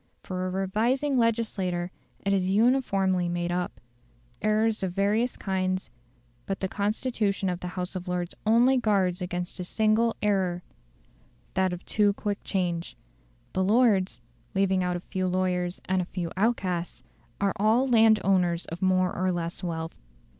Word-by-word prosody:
For 185 0 -3
a - - -2
revising 230 +9 +1
legislature, 195 -6 0 0.3
it 200 - +2
is 195 - +3
too - - -1
uniformly 195 -6 +2
made 175 0 -1
up. 180 0 -2 0.6
Errors 215 +1 +2
are 190 - 0
of 175 - -6
various 210 +5 +1
kinds; 185 -1 -2 0.6
but 195 - -2
the 190 - -1
constitution 205 -1 -1
of 180 -1 -2
the 180 - -5
House 180 +1 -3
of 180 0 -5
Lords 180 -1 -2
only 240 +5 +4
guards 195 -6 +1
against 180 +1 -4
a - - -2
single 220 +4 +2
error 185 -4 +1 0.9
that 190 -1 +2
of 180 0 -6
too 205 -1 +2
quick 205 0 -3
change. 175 -3 -2 0.6
The 190 - +1
Lords 205 - +3 0.3
leaving 190 -1 +2
out 180 0 0
a - - -8
few 185 +1 -2
lawyers 180 -1 0
and 185 0 +1
a - - -3
few 175 -2 -4
outcasts 185 -5 -1 0.4
are 200 -1 +1
all 220 +6 +3
landowners 195 -7 +3
of 165 +2 -7
more 185 -1 +2
or 185 0 +1
less 175 +1 -3
wealth. 165 -2 -4
190 Hz, 155 wpm, -27 LUFS, 180-215 Hz, 0.9 s, only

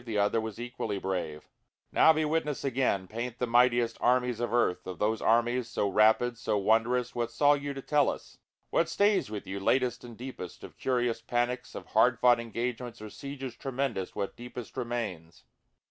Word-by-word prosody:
the 115 -3 -3
other 105 +2 +2
was 110 0 -6
equally 120 -4 -4
brave;) 90 -6 -4 0.4
Now 160 - +6
be 155 0 +1
witness 150 -2 -1
again, 125 -8 0
paint 120 +3 -5
the 125 - 0
mightiest 120 -1 +3
armies 125 -1 +2
of 120 - -2
earth, 120 -8 +1
Of 90 -2 -5
those 110 +3 0
armies 120 +2 +2
so 105 - 0
rapid 110 +4 +3
so 105 - 0
wondrous 115 +5 +2
what 120 -1 -1
saw 145 0 +4
you 145 -1 -3
to 135 - -7
tell 145 -2 +3
us? - - -7 0.3
What 165 - +2
stays 200 - +2
with 105 -1 -6
you 95 +1 -4
latest 125 +4 +1
and 120 -2 -10
deepest? 120 -9 -8
of - - -11
curious 120 -3 0
panics, 120 +2 -2
Of - - -7
hard 120 -1 +4
fought 120 -1 +5
engagements 120 +1 -4
or 105 0 -8
sieges 135 -3 -7
tremendous 130 -7 -3
what 100 -1 -3
deepest 120 -1 -9
remains? 115 -10 -4
120 Hz, 180 wpm, -29 LUFS, 110-125 Hz, 0.4 s, Now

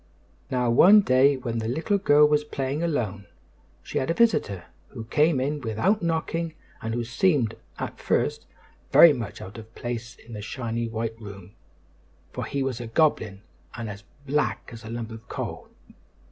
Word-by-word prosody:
Now 125 -2 +1
one 200 - +8
day 135 -2 +4
when 120 -3 -3
the 110 - -3
little 165 - 0
girl 150 -5 +6
was 150 0 +2
playing 140 0 -3
alone, 110 - -2 0.6
she - - -2
had 130 - -2
a 165 - +1
visitor 105 - +2 0.2
who 115 -4 -8
came 150 +5 +2
in 145 +3 -1
without 130 - +1
knocking 165 -1 -2 0.3
and 115 +1 -3
who 120 - -1
seemed, 120 - +1 0.2
at - - -5
first, - - 0 0.4
very 170 -3 +9
much 120 -6 -6
out 95 +5 -9
of 110 +1 -14
place 120 0 -5
in 115 - -14
the 105 - -6
shining 115 0 -3
white 115 0 -4
room, 100 -2 -10 0.8
for - - -4
he 140 -1 -2
was 130 -3 -3
a 120 - -6
goblin 110 -7 +1 0.3
and 115 -2 -5
as 100 +1 -10 0.2
black 145 0 -1
as 115 0 -10
a 110 - -8
lump 115 -1 -5
of 110 0 -11
coal. - - -5
120 Hz, 175 wpm, -25 LUFS, 115-150 Hz, 0.8 s, very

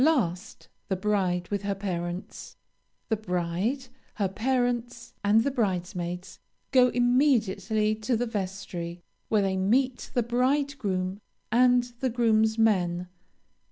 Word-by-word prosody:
Last, 205 - 0 0.2
the 190 - 0
bride 185 -3 0
with 200 -1 -1
her 200 -1 -2
parents. 180 -2 -5 0.5
The 220 - +3
bride, 190 +6 -2 0.3
her 200 -3 +1
parents, 240 +1 -1
and 210 +2 +4
the 280 - 0
bridesmaids 180 -5 -2 0.3
go 255 -2 +6
immediately 230 -5 +2
to 220 +3 -1
the 245 - 0
vestry, 185 -5 -5 0.3
where 210 -2 +3
they 190 -1 0
meet 245 +7 +1
the 245 - +3
bridegroom, 240 -6 0 0.3
and 245 +1 +5 0.2
the 260 - 0
groomsmen. 220 -6 +2
215 Hz, 115 wpm, -27 LUFS, 185-245 Hz, 0.5 s, go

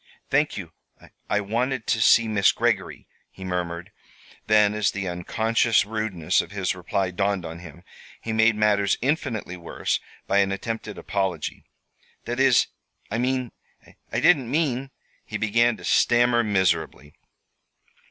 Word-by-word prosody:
"Thank - - +2
you. - - -7 0.6
I 105 - +1
wanted 120 +4 -2
to 110 - 0
see 115 +1 +5
Miss 105 -3 +3
Greggory," 110 -6 -1 0.2
he 95 - -12
murmured. 90 -2 -4 0.6
Then, 105 -1 +4
as 105 -1 +1
the 100 -1 -4
unconscious 110 +6 +1
rudeness 105 -7 0
of - - -10
his 95 -2 -2
reply 95 +1 -2
dawned 100 0 -1
on 80 +1 -7
him, 85 -1 -12 0.4
he 115 - -4
made 110 0 +4
matters 105 -2 +2
infinitely 125 - -2
worse 85 -1 -2 0.3
by 100 - +2
an 100 0 +2
attempted 110 +1 -5
apology. 95 -5 -3 0.6
"That 120 +2 -3
is, 135 -3 +5 0.5
I 115 - -1
mean 130 -1 -1 0.6
I - - 0
didn't 140 -9 +4
mean 135 -3 0 0.2
" - - -38
he - - -5
began 115 +2 +2
to - - -10
stammer 120 0 +3
miserably. 95 -7 0
105 Hz, 145 wpm, -24 LUFS, 95-120 Hz, 0.6 s, see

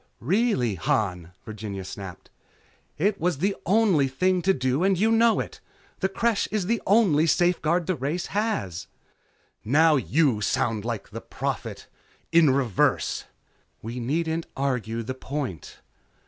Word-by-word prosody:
"Really, 175 - +1
Han," 90 -1 -1
Virginia 105 -3 -6
snapped, 95 -1 -9 0.7
"It 195 +3 0
was 175 -2 +1
the 195 +7 0
only 190 -8 +3
thing 180 +7 +1
to 195 - +3
do 130 0 0
and 195 -1 +3
you 220 +5 +2
know 225 0 +4
it. - - -5 0.4
The 190 - 0
Creche 225 +2 0
is 210 -3 -1
the 230 +3 0
only 185 -7 +4
safeguard 175 0 +2
the 185 - 0
race 155 +4 -3
has." 200 - -2 0.8
"Now 155 +6 +4
you 125 - +1
sound 110 +1 0
like 115 -4 -4
the - - -7
Prophet. - - -5 0.5
In 165 -3 +6
reverse." 130 -7 +1 0.6
"We 115 +3 -5
needn't 160 +6 -1
argue 120 -4 -2
the 130 +4 -4
point." 130 - -6
150 Hz, 135 wpm, -25 LUFS, 115-185 Hz, 0.8 s, In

